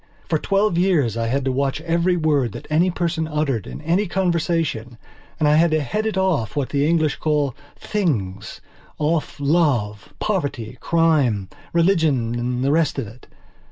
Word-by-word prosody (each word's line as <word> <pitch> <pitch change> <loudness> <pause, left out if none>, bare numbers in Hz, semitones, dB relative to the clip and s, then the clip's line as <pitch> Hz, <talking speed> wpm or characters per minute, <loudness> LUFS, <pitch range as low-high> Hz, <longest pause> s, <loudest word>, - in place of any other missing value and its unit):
For 160 - +1
twelve 195 -1 +1
years 160 - +2
I 115 0 -1
had 135 +3 -1
to 135 - +1
watch 135 +2 -1
every 170 +2 +1
word 145 - +1
that - - -8
any 170 +4 +3
person 170 -2 -1
uttered 150 - -1
in - - -8
any 175 +7 +1
conversation 165 -10 -1 0.4
and 155 - +2
I 150 +1 +4
had 170 +1 +4
to 155 0 +1
head 210 - -2
it 215 - -2
off 180 - 0
what 140 -3 -1
the 145 0 +1
English 160 -3 +1
call 150 -4 0 0.2
"things"off 150 - -3
love, 140 - +1
poverty, 140 - -3
crime, 145 - +2 0.2
religion 160 -9 +2
and 125 +1 -2
the 140 - +2
rest 160 -1 +1
of 135 - -2
it. 115 +4 -14
150 Hz, 160 wpm, -21 LUFS, 125-170 Hz, 0.4 s, I